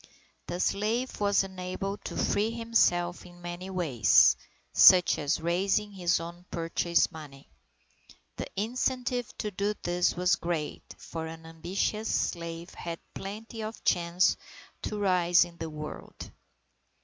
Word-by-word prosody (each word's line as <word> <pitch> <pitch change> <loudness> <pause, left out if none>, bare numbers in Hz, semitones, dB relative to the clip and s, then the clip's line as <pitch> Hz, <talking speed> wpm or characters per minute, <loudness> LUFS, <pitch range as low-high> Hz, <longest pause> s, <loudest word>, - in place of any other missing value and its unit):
The 175 +1 -4
slave 225 +7 0
was 200 -1 +3
enabled 190 +1 -5
to - - -5
free 210 +2 +1
himself 225 -7 +1
in 175 -1 -14
many 175 +2 -6
ways, 150 - +5 0.4
such 180 -3 +7
as 145 +1 0
raising 190 +5 +1
his 175 -3 +1
own 170 +1 -8
purchase 170 +1 +1
money. 145 -4 -11 0.9
The - - -4
incentive 245 +2 -1
to 210 - -3
do 200 +2 -1
this 175 0 +1
was 180 +1 +3
great, 165 -3 -4
for 160 -1 -6
an 160 0 -9
ambitious 180 +7 -2
slave 170 0 -2
had 170 -1 -6
plenty 220 +3 -7
of 215 +1 -6
chance 175 +1 +2 0.4
to 210 - -4
rise 180 -3 +4
in 170 -1 -14
the 165 -1 -5
world. 150 0 -8
180 Hz, 130 wpm, -29 LUFS, 170-205 Hz, 0.9 s, such